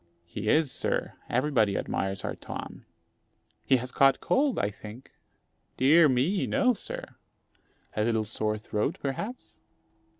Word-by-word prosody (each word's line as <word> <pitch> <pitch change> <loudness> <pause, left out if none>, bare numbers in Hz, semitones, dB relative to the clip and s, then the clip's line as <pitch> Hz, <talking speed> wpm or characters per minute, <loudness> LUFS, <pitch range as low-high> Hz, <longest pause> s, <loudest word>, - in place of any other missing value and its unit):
"He 105 +5 -4
is, 155 -1 +3
sir; - - -1 0.2
everybody 120 -6 +2
admires 95 0 -2
our - - -3
Tom." - - -8 0.8
"He 130 - +4
has 125 +1 -5
caught 135 0 +4
cold, 275 -1 +1
I 100 - 0
think?" 110 +5 -11 0.7
"Dear 150 +4 +6
me! 140 +10 +1
no, 260 -2 +3
sir." - - -6 0.9
"A 105 - +1
little 110 -1 +1
sore 110 0 -1
throat, 105 0 -2
perhaps?" 200 - -5
125 Hz, 130 wpm, -28 LUFS, 105-155 Hz, 0.9 s, Dear